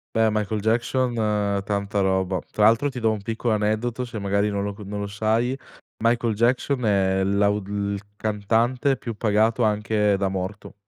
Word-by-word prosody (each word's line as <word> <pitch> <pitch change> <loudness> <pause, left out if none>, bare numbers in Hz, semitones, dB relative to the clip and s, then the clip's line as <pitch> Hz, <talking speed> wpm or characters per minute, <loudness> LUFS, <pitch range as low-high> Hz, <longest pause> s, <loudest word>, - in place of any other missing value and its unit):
Eh, 110 0 +4
Michael 105 0 -1
Jackson 120 +3 +1 0.5
tanta 100 0 -2
roba. 95 -1 +1
Tra 105 - +3
l'altro 115 +6 +4
ti 130 -2 -6
do 115 -1 +2
un 105 -2 -3
piccolo 115 0 -1
aneddoto 110 +4 -1
se 115 -3 -6
magari 100 +1 +1
non 100 -1 -2
lo 100 0 -3
co 105 - -10
non 105 +1 -5
lo 100 - -3
sai. 110 +5 0 0.5
Michael 115 -1 +2
Jackson 125 +2 +1
è 95 -2 +2
l'au 100 +1 +2
il 100 0 -2 0.2
cantante 115 +6 +1
più 115 -2 -6
pagato 110 +2 +2
anche 105 -1 +2
da 100 - 0
morto. 95 +2 -5
105 Hz, 170 wpm, -24 LUFS, 100-115 Hz, 0.5 s, Eh